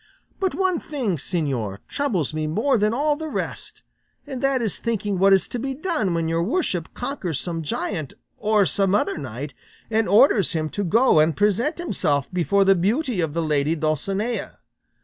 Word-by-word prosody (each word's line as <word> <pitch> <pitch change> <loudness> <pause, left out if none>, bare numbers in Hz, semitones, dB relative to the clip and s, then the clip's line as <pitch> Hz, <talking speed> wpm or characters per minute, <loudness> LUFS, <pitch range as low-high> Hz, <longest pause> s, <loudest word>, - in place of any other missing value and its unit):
But 380 -2 0
one 370 -3 +1
thing, 245 - -2
señor, 135 - -2
troubles 200 - -1
me 155 0 -2
more 225 - +1
than 210 +1 +2
all 290 +5 +1
the 315 +1 -5
rest, - - -5 0.4
and 270 -4 -6
that 275 -1 +2
is 225 -5 -2
thinking 205 -4 -1
what 195 +1 +5
is 195 -1 +4
to 245 - -4
be 270 +2 -3
done 295 - -1
when 165 -1 0
your 165 +1 0
worship 190 - -1
conquers 200 - -3
some 170 -2 -4
giant, 155 -1 -3 0.2
or 215 -1 +2
some 195 0 +2
other 205 - 0
knight, 135 +1 -6 0.4
and 225 0 +2
orders 205 - +5
him 155 -1 -1
to 205 - -3
go 220 0 +4
and 155 +1 +3
present 210 - +1
himself 150 - 0
before 195 +3 +2
the 195 - +6
beauty 215 - 0
of 160 -2 -2
the 165 - 0
lady 150 0 +1
Dulcinea. 190 - -2
195 Hz, 180 wpm, -23 LUFS, 160-250 Hz, 0.4 s, the